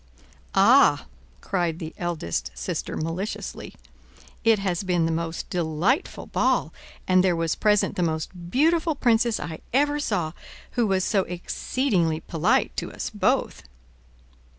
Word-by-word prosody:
"Ah," 200 - +5 0.4
cried 175 -4 -1
the 160 -1 -7
eldest 155 - -3
sister - - -4
maliciously, 165 +6 -4 0.7
"it 225 -1 +5
has 190 -3 -1
been 180 -4 +1
the 165 - 0
most 165 0 -3
delightful 175 - 0
ball, - - +1 0.3
and 185 0 +4
there 180 -2 +3
was 165 -1 0
present 210 -1 +2
the - - 0
most 170 +1 -3
beautiful 320 - +2
princess 235 -3 +2
I 160 -2 -6
ever 290 +2 +2
saw, 180 - -1 0.4
who 235 -2 +1
was 190 -2 +1
so 200 -3 +2
exceedingly 180 - -1
polite 160 -1 +1
to - - -3
us - - -5
both." - - 0
180 Hz, 130 wpm, -25 LUFS, 165-225 Hz, 0.7 s, Ah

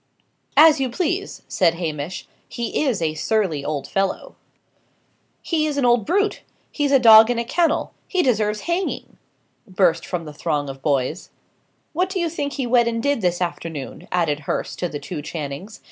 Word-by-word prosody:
"As 310 0 +7
you 265 -1 0
please," 365 +7 -2
said 165 - +2
Hamish. 160 0 -4 0.2
"He 235 +5 -2
is 230 -11 0
a 155 -1 0
surly 165 -3 0
old 145 -2 -3
fellow." 195 0 -2 1.1
"He 310 -2 0
is 295 -2 -3
an 275 - +2
old 240 -3 +3
brute! 405 +4 +1 0.3
he's 290 -2 0
a 275 - +7
dog 225 -2 +8
in 245 - 0
a 235 - 0
kennel! 335 +7 0
he 370 -2 +1
deserves 210 -5 +1
hanging!" 345 +3 -3 0.5
burst 185 -4 +2
from 175 -3 -4
the 150 - -8
throng 145 -2 -2
of 135 0 -8
boys. 140 +3 -1 0.6
"What 365 +4 0
do 380 0 -2
you 340 -1 0
think 290 -3 -3
he 270 - -2
went 240 -1 +3
and 230 0 -3
did 285 -4 +1
this 180 -1 0
afternoon?" 165 -5 -5
added 165 -5 +1
Hurst - - -3
to 175 - -1
the 150 - -5
two 150 +2 -6
Channings. 155 +6 -6
215 Hz, 175 wpm, -22 LUFS, -, 1.1 s, dog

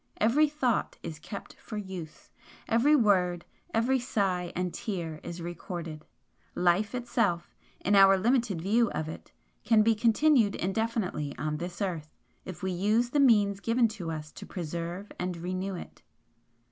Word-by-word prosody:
Every 280 +8 +4
thought 260 -7 0
is 160 -2 -6
kept 200 +5 -8
for 215 - -7
use, 190 -6 -8 0.4
every 255 +7 +4
word, 180 -8 +2 0.3
every 250 +4 +2
sigh 190 -7 -1
and 180 -1 -2
tear 175 -9 -4
is 170 0 -7
recorded. 170 -2 -6 0.5
Life 180 +5 +2
itself, 235 -8 -1 0.3
in 205 - +1
our 195 0 +7
limited 220 -4 +1
view 225 +4 +3
of 155 - -2
it, 160 - -9 0.3
can 215 0 +5
be 225 +1 +4
continued 230 0 +3
indefinitely 195 -7 -2
on 150 +3 -2
this 175 +4 -4
earth, 165 -5 -4 0.3
if 180 0 -8
we 190 - 0
use 215 +7 +1
the 290 - +2
means 205 -7 +4
given 230 +3 +2
to 195 -6 -6
us 155 -1 -5
to - - -10
preserve 175 +2 -5
and 180 -1 -2
renew 185 +3 -3
it. - - -10
195 Hz, 150 wpm, -29 LUFS, 175-230 Hz, 0.5 s, our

